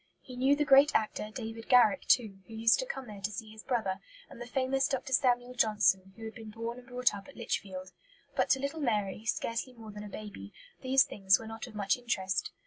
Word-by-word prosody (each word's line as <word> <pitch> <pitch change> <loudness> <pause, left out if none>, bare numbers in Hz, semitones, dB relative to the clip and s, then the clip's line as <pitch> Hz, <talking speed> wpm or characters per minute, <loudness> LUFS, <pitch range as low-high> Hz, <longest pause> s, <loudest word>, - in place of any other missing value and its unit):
He 255 - -11
knew 265 +3 +3
the 295 +1 +1
great 280 +2 +6
actor, 215 -1 0
David 225 -1 -7
Garrick, 230 -6 +5
too, 215 -6 +3
who 225 - -10
used 225 +1 +4
to - - -2
come 270 - -5
there 210 -3 -10
to 205 - -1
see 215 +2 -7
his 220 0 -11
brother; 220 -8 -1 0.3
and 240 - -11
the 240 - -6
famous 270 +1 +1
Dr. 265 -1 -3
Samuel 245 -1 +2
Johnson, 210 -5 +2
who 225 - -9
had 220 - -6
been 225 -2 -10
born 230 +2 -5
and 250 - -16
brought 250 -2 +1
up 200 -1 -8
at 280 - -14
Lichfield. 190 -5 -4 0.4
But - - +1
to 270 - +4
little 280 +4 -3
Mary, 210 -4 -1
scarcely 230 +3 -2
more 225 -3 -11
than 210 0 -8
a 210 - -8
baby, 200 - -9 0.3
these 265 0 +5
things 195 -1 +3
were 225 - -10
not 225 +2 -7
of 225 - -12
much 200 0 +1
interest. 195 -6 -1
225 Hz, 225 wpm, -31 LUFS, 210-250 Hz, 0.4 s, great